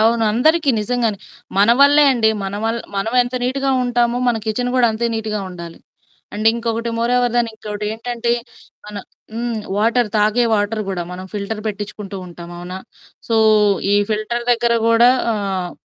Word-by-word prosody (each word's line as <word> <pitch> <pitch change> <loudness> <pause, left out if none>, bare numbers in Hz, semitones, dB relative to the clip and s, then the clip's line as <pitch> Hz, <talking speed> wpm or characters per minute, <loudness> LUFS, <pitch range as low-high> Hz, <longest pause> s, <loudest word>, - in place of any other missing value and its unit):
అవును. 225 +1 +3
అందరికీ 310 +6 +3
నిజంగానే, 225 -2 -1 0.4
మన 205 +3 +5
వల్లే 290 +1 +6
అండి. 230 -4 +2 0.2
మన 195 +1 -4
వల్ 225 +1 0 0.2
మనం 195 +3 -2
ఎంత 245 +1 -6
నీట్‌గా 270 +2 0
ఉంటామో 240 0 +1
మన 240 - +2
కిచెన్ 245 +3 -1
గూడా 250 -2 +4
అంతే 230 +2 -1
నీట్‌గా 215 -1 -3
ఉండాలి. 170 -2 -9 0.6
అండ్ 215 +1 -2
ఇంకొకటి 230 0 -2
మోర్ 235 +1 0
ఓవర్ 245 -1 +1
దెన్ 240 -1 +2
ఇంకొకటేంటంటే 220 +3 -4 0.5
మన 210 0 -10 0.4
హ్మ్, 235 0 -2 0.2
వాటర్ 230 +2 +2
తాగే 215 +3 +3
వాటర్ 210 +1 0
గూడా 185 -3 -2
మనం 180 +1 -7
ఫిల్టర్ 210 +1 -4
పెట్టిచ్చుకుంటూ 205 -1 -5
ఉంటాం. 170 -1 -10
అవునా? 180 +1 -7 0.5
సో 230 - +1 0.6
ఈ - - +4 0.2
ఫిల్టర్ 220 +3 -2
దగ్గర 235 0 +1
గూడా 230 +2 +5 0.2
ఆహ్, 195 -4 -2
225 Hz, 155 wpm, -19 LUFS, 210-240 Hz, 0.6 s, వల్లే